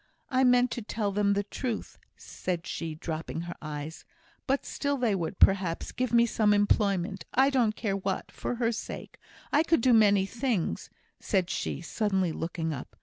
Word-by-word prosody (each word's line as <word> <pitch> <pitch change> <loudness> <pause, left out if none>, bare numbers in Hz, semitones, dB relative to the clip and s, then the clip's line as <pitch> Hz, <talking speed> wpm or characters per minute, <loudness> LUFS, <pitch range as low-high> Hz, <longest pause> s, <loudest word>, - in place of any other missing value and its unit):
I 260 0 +3
meant 250 -1 +4
to 240 - -3
tell 210 -1 -2
them 200 0 +2
the 200 0 0
truth," 225 +3 -5 0.2
said 175 -1 -4
she, 160 -2 -4
dropping 160 +1 -4
her 175 +1 -5
eyes; 155 +1 -6 0.4
"but 270 0 +1
still 285 -1 -1
they 240 -5 +1
would, 185 0 -2
perhaps, 185 -4 +3
give 255 0 -2
me 235 0 +5
some 210 -2 +3
employment 200 -3 +1
I 270 +2 +5
don't 235 -5 +2
care 200 -4 -1
what 195 -1 -3
for - - -3
her 235 -1 +1
sake. 225 - -7 0.3
I 295 - +6
could 330 -5 +2
do 250 +1 +4
many 205 -3 +5
things," 230 -4 -2 0.3
said 190 -3 0
she, 140 - -3
suddenly 190 -1 0
looking 165 0 -3
up. 135 - -8
205 Hz, 175 wpm, -28 LUFS, 175-235 Hz, 0.4 s, I